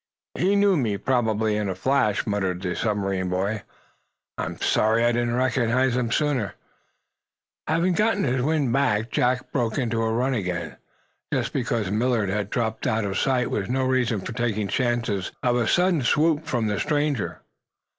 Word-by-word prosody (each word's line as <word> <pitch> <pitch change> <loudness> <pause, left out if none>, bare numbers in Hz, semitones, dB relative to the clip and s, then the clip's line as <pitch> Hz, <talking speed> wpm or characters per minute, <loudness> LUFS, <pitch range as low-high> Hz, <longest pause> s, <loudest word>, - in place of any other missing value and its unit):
"He 190 +3 +1
knew 200 -1 +4
me, 110 -7 0
probably, 110 -3 +1
in 105 -2 -1
a 95 - -2
flash," 110 -1 +1
muttered 95 -3 -1
the 90 -1 -2
submarine 95 -4 -1
boy. 100 +4 -1 0.7
"I'm - - -4
sorry 110 +2 +2
I 120 - +4
didn't 120 0 0
recognize 130 0 +1
him 125 -2 0
sooner." 135 - 0 1.1
Having 170 +4 +2
gotten 210 +2 +1
his 125 -1 +1
wind 145 -3 +1
back, 110 -4 +1
Jack 125 0 0
broke 120 -5 -1
into 115 -4 0
a 110 0 0
run 125 +4 +1
again. 90 -7 -3 0.5
Just - - -1
because 115 -6 -1
Millard 110 -1 +1
had 100 0 -2
dropped 110 -1 -2
out 110 -1 0
of 95 -1 -1
sight 130 -2 +1
was 100 -2 -2
no 130 +1 0
reason 125 -5 +1
for 115 - -6
taking 115 -3 -1
chances 115 -3 -1
of 120 -2 +2
a 120 -2 +1
sudden 180 -3 +3
swoop 155 +4 +2
from 120 -7 0
the 105 -1 -1
stranger. 145 -6 -1
120 Hz, 165 wpm, -24 LUFS, 105-130 Hz, 1.1 s, knew